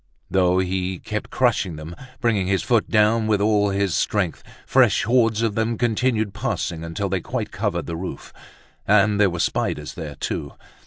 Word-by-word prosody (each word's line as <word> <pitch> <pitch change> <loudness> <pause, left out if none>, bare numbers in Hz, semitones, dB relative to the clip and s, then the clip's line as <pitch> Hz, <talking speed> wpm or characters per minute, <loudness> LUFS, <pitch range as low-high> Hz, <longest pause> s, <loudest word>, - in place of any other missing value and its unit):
Though 90 -1 +3
he 95 0 -1
kept - - -5
crushing 85 -4 +1
them, 80 +3 -8 0.2
bringing 105 -6 +1
his 95 0 +1
foot 120 -3 +1
down 110 +1 +3
with 105 -2 +2
all 105 0 +2
his 100 -2 0
strength, 95 -6 0 0.2
fresh - - +4
hordes 115 -1 +2
of 110 -2 +1
them 110 +1 -1
continued 115 -3 0
passing, 105 -7 -3
until 85 +5 -3
they 95 -1 -1
quite - - -4
covered - - -2
the 85 - -4
roof. 90 +2 -7 0.5
And 105 0 +4
there 100 -2 +5
were 85 - -5
spiders - - -1
there - - -7
too! - - -4
100 Hz, 170 wpm, -22 LUFS, 95-110 Hz, 0.5 s, there